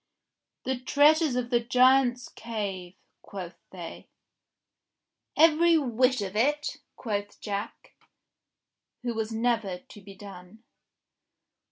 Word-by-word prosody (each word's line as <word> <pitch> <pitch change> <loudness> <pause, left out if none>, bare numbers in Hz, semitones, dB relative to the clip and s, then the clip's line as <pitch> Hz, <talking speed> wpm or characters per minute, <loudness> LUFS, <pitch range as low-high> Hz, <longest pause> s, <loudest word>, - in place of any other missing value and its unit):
"The 260 -1 -2
treasures 295 +2 +4
of 245 0 -2
the 240 - +4
Giant's 250 +1 +3
Cave," 200 -6 -5 0.3
quoth 185 -3 -9
they. 175 -3 -9 1.3
"Every 330 +1 +5
whit 255 -3 +1
of 195 0 -6
it.^" 295 +6 0 0.2
quoth 205 -3 -4
Jack, 205 -1 -6 1.1
who 240 -1 -2
was 220 0 -3
never 225 -4 0
to 200 +3 -15
be 195 0 -13
done. 195 +2 -12
235 Hz, 100 wpm, -27 LUFS, 200-255 Hz, 1.3 s, Every